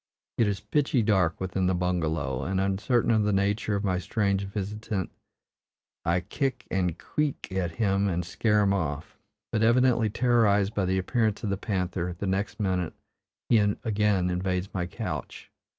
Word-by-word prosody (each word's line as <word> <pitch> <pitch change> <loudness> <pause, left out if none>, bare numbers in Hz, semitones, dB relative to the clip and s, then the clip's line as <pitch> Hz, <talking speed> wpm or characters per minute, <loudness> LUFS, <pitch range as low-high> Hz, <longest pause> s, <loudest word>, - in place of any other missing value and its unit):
It 115 - +4
is 100 -1 -1
pitchy 130 +2 +1
dark 95 -6 +2
within 95 0 -1
the 95 - +2
bungalow, 80 -7 -1
and, 95 +1 -1
uncertain 100 +6 +1
of 110 -1 +4
the 105 0 +1
nature 100 +2 +1
of 100 - -2
my 95 -3 +1
strange 100 +2 0
visitant, 100 0 -4 0.9
I 85 +2 +1
kick 130 - -2
and 90 -3 0
"qu - - -3
e 150 - +4
e 140 - -4
k" 95 0 -3
at 85 -2 -2
him 100 -1 +1
and 90 -2 -1
scare 105 +4 +2
him 100 -1 +3
off; 75 -6 -3 0.4
but, 110 - 0
evidently 120 -1 +4
terrorized 110 -3 +3
by 100 - 0
the 95 +1 +1
appearance 110 +2 0
of 105 - -1
the - - +1
panther, 90 -4 -2
the 100 - -4
next 95 +3 -1
minute 90 -5 -1 0.5
he 115 - +5
again 105 -3 +1
invades 90 +1 -2
my 90 -2 -2
couch. - - -6
100 Hz, 175 wpm, -27 LUFS, 90-105 Hz, 0.9 s, he